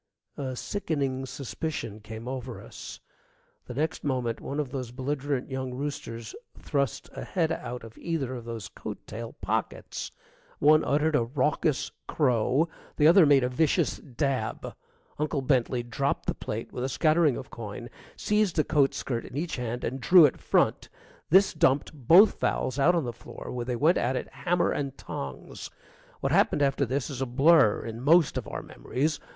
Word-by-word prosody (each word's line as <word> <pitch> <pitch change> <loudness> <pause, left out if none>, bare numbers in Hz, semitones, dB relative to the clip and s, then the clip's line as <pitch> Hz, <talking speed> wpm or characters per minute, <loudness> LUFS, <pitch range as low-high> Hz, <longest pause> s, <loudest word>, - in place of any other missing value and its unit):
A 130 -2 -4
sickening 135 -6 -2
suspicion 130 -4 -5
came 110 +2 -9
over 130 -2 -5
us. - - -10 0.7
The 125 - -7
next 155 +4 -1
moment 125 -5 -1
one 140 - -4
of 140 -4 -2
those 130 -3 -4
belligerent 135 +1 -3
young 130 -1 -3
roosters 115 -5 -5 0.2
thrust 140 -4 -2
a - - -6
head 165 -4 0
out 125 -7 -4
of 115 -1 -12
either 155 -7 -2
of 120 -2 -7
those 115 -3 -5
coat - - -8
tail 115 +1 -7
pockets. - - -3 0.5
One 155 +2 +5
uttered 150 +3 +2
a 120 - +4
raucous 145 +4 0 0.2
crow, 130 +2 +2 0.3
the 150 - +4
other 170 0 +7
made 140 -2 +5
a - - +2
vicious 150 +4 +1
dab. 130 -3 -3 0.5
Uncle 150 -2 -1
Bentley 125 -2 +1
dropped 135 +4 -1
the - - 0
plate - - -5
with 125 - -4
a 130 - -1
scattering 155 0 +3
of 130 - -8
coin, 115 +1 -7 0.3
seized 210 -4 +1
a 155 - +4
coat 145 -3 +2
skirt 120 -3 -3
in 130 - -8
each 165 0 -2
hand, 120 0 -3
and 130 +2 -3
drew 175 +1 +8
it 140 - 0
front. - - +1 0.4
This 190 +4 +5
dumped 135 +4 +2
both 165 - +6
fowls 130 +2 0
out 175 +6 +5
on 170 - +1
the 120 -2 -4
floor, 115 - -9
where 120 -1 -3
they 125 0 -2
went 155 +8 +3
at 125 +2 0
it - - -3
hammer 175 -1 +1
and 140 -1 -3
tongs. 70 - -7 0.5
What - - 0
happened 145 - +3
after 135 -1 +1
this 140 +2 -2
is 135 -1 -5
a 135 - 0
blur 135 -2 +4
in 115 0 -6
most 160 +3 +4
of - - -3
our - - -5
memories. 150 +5 -2
135 Hz, 175 wpm, -27 LUFS, 125-150 Hz, 0.7 s, drew